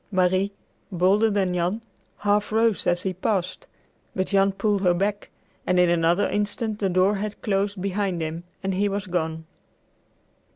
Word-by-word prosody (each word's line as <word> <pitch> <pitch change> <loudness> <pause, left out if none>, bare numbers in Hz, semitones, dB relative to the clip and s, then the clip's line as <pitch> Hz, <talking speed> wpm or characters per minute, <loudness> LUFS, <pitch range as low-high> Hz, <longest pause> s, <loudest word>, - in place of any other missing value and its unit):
Marie, 185 +1 +2 0.4
bolder 195 +5 +3
than 195 -3 0
Jan, 180 +6 -1 0.3
half 205 0 +1
rose 225 -1 +2
as 175 0 +2
he 190 - -1
passed, 190 - -2 0.5
but 185 - 0
Jan 195 0 +3
pulled 205 0 0
her 180 -2 +3
back, 205 +3 -2 0.4
and 180 0 +3
in 180 -1 +5
another 175 +3 +2
instant 210 +1 -2
the 195 - +1
door 185 +3 +3
had 210 +1 -4
closed 200 -1 0
behind 195 -1 -1
him 160 +1 -4 0.2
and 190 0 -1
he 200 +2 +1
was 200 +1 -3
gone. 160 -3 -2
195 Hz, 160 wpm, -24 LUFS, 180-205 Hz, 0.5 s, in